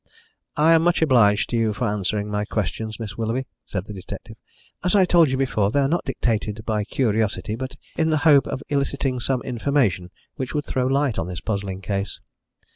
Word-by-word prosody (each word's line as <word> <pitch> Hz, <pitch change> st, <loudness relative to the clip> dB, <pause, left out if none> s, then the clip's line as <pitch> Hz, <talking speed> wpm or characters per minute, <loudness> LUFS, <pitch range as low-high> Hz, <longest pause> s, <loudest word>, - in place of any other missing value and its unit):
"I 155 Hz, +2 st, +5 dB
am 165 Hz, -, +5 dB
much 175 Hz, 0 st, +3 dB
obliged 115 Hz, -8 st, +4 dB
to -, -, 0 dB
you 115 Hz, -2 st, +1 dB
for 105 Hz, +4 st, -2 dB
answering 105 Hz, 0 st, -1 dB
my 105 Hz, 0 st, 0 dB
questions, 110 Hz, +1 st, -3 dB
Miss 110 Hz, -1 st, -6 dB
Willoughby," 115 Hz, +4 st, -1 dB, 0.2 s
said 95 Hz, -2 st, -3 dB
the 105 Hz, -, -8 dB
detective. 95 Hz, -2 st, -8 dB, 0.5 s
"As 180 Hz, +3 st, +2 dB
I 190 Hz, -2 st, +6 dB
told 170 Hz, -4 st, +5 dB
you 130 Hz, -, 0 dB
before, 120 Hz, -7 st, +1 dB
they 140 Hz, -, +1 dB
are 135 Hz, -, +2 dB
not 170 Hz, +5 st, 0 dB
dictated 110 Hz, -2 st, -2 dB
by 105 Hz, -2 st, 0 dB
curiosity, 110 Hz, -3 st, 0 dB
but 130 Hz, +3 st, -5 dB, 0.2 s
in 160 Hz, 0 st, +1 dB
the 155 Hz, -, +3 dB
hope 145 Hz, -3 st, +6 dB
of 130 Hz, -, -4 dB
eliciting 140 Hz, -2 st, -1 dB
some 125 Hz, 0 st, 0 dB
information 120 Hz, -8 st, 0 dB, 0.3 s
which 130 Hz, 0 st, -4 dB
would 150 Hz, -, -1 dB
throw 130 Hz, -1 st, 0 dB
light 135 Hz, -5 st, +1 dB
on 90 Hz, -, -2 dB
this 90 Hz, -2 st, -5 dB
puzzling 100 Hz, -3 st, -3 dB
case." 100 Hz, 0 st, -3 dB
115 Hz, 200 wpm, -23 LUFS, 105-140 Hz, 0.5 s, I